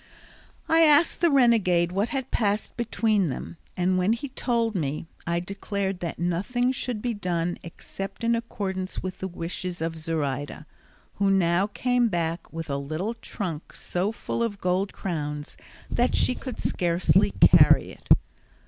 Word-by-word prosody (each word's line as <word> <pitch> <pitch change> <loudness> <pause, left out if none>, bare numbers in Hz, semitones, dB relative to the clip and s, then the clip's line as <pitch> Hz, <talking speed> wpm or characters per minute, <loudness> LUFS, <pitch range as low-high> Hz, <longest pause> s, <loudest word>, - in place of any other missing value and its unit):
I 325 - +4
asked 310 +1 +5
the 340 - +5
renegade 220 - +4
what 200 +5 0
had 265 -2 -3
passed 210 -1 0
between 220 -5 +1
them, 150 +5 -6 0.2
and 185 +1 +2
when 185 +5 +3
he 250 +4 -4
told 235 -3 0
me, 150 -4 -2 0.2
I 170 0 +1
declared 195 +1 -3
that 170 -2 -4
nothing 200 +9 0
should 250 -4 -3
be 245 -1 0
done 175 -4 -2
except 195 +5 -8
in 230 0 +3
accordance 195 -5 -3
with 185 -1 -5
the 190 - -3
wishes 175 0 -5
of 165 0 -3
Zoraida, 150 -2 -3 0.5
who 200 -1 +2
now 190 0 +3
came 245 +3 +1
back 170 -4 -2
with 165 0 -5
a 140 -1 -1
little 155 +10 -3
trunk 180 -8 -6
so 185 +4 -1
full 230 - -4
of 215 -4 -1
gold 185 +2 0
crowns 150 -5 -4 0.4
that 245 - +2
she - - +2
could 255 -1 -7
scarcely 175 0 +2
carry - - +6
it. - - -17
190 Hz, 155 wpm, -26 LUFS, 170-230 Hz, 0.5 s, carry